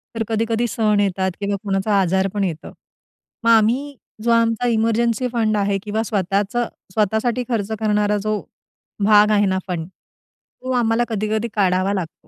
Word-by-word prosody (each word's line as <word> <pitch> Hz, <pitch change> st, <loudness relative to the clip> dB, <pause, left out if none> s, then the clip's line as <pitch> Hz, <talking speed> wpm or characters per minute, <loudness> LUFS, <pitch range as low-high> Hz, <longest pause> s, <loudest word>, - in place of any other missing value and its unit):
तर 225 Hz, -, -1 dB
कधी-कधी 225 Hz, +1 st, 0 dB
सण 215 Hz, -3 st, +1 dB
येतात 190 Hz, -1 st, 0 dB
किंवा 200 Hz, 0 st, -1 dB
कोणाचा 200 Hz, 0 st, +1 dB
आजार 190 Hz, +1 st, +1 dB
पण 205 Hz, -1 st, -1 dB
येतो, 165 Hz, -4 st, -4 dB, 0.7 s
मग 230 Hz, -, +2 dB
आम्ही 245 Hz, +6 st, +2 dB, 0.3 s
जो 235 Hz, -, +2 dB
आमचा 230 Hz, +1 st, +2 dB
इमर्जन्सी 230 Hz, +2 st, +1 dB
फंड 215 Hz, -2 st, +1 dB
आहे 200 Hz, -1 st, +1 dB
किंवा 215 Hz, +1 st, -2 dB
स्वतःचं 205 Hz, +3 st, -1 dB, 0.3 s
स्वतःसाठी 220 Hz, +4 st, 0 dB
खर्च 220 Hz, -2 st, -1 dB
करणारा 210 Hz, -1 st, +1 dB
जो 215 Hz, 0 st, -2 dB, 0.6 s
भाग 210 Hz, 0 st, +6 dB
आहे 205 Hz, -1 st, +3 dB
ना 190 Hz, 0 st, +1 dB
फंड, 170 Hz, -3 st, -3 dB
तो 255 Hz, +6 st, -13 dB
आम्हाला 235 Hz, -1 st, +2 dB
कधी-कधी 215 Hz, +1 st, -1 dB
काढावा 190 Hz, -1 st, +1 dB
लागतो. 180 Hz, -5 st, -6 dB
215 Hz, 150 wpm, -20 LUFS, 200-230 Hz, 0.7 s, भाग